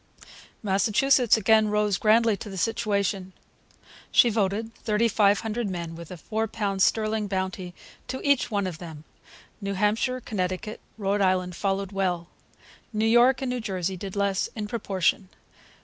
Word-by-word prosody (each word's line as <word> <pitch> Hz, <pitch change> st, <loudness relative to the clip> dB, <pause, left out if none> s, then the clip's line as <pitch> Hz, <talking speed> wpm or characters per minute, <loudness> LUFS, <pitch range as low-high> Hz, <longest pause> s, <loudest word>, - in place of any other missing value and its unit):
Massachusetts 215 Hz, +5 st, +3 dB
again 220 Hz, 0 st, +4 dB
rose 210 Hz, -1 st, +1 dB
grandly 225 Hz, 0 st, +4 dB
to 205 Hz, -, -8 dB
the 195 Hz, -, -7 dB
situation. 200 Hz, -3 st, -1 dB, 0.8 s
She 240 Hz, -, +5 dB
voted 215 Hz, +1 st, -1 dB
3,500 215 Hz, 0 st, +1 dB
men, 170 Hz, -3 st, -5 dB
with 170 Hz, 0 st, -10 dB
a 180 Hz, -, -8 dB
four 220 Hz, +7 st, -2 dB
pound 200 Hz, -3 st, -2 dB
sterling 215 Hz, +1 st, +2 dB
bounty 185 Hz, -2 st, -3 dB, 0.3 s
to 260 Hz, -, -4 dB
each 280 Hz, -4 st, +3 dB
one 200 Hz, -3 st, 0 dB
of 175 Hz, -3 st, -5 dB
them. 160 Hz, -4 st, -9 dB, 0.6 s
New 200 Hz, 0 st, -3 dB
Hampshire, 220 Hz, +6 st, +1 dB
Connecticut, 200 Hz, -1 st, -4 dB, 0.2 s
and 215 Hz, -, -10 dB
Rhode 200 Hz, +1 st, +1 dB
Island 185 Hz, -2 st, +1 dB
followed 195 Hz, 0 st, -1 dB
well. 180 Hz, -3 st, -1 dB, 0.6 s
New 215 Hz, 0 st, 0 dB
York 240 Hz, +3 st, +4 dB
and 255 Hz, -, -1 dB
New 250 Hz, -1 st, -2 dB
Jersey 190 Hz, -3 st, -2 dB
did 190 Hz, +2 st, -7 dB
less 200 Hz, -1 st, 0 dB
in 210 Hz, -2 st, -4 dB
proportion. 195 Hz, -4 st, -1 dB
205 Hz, 150 wpm, -26 LUFS, 190-220 Hz, 0.8 s, She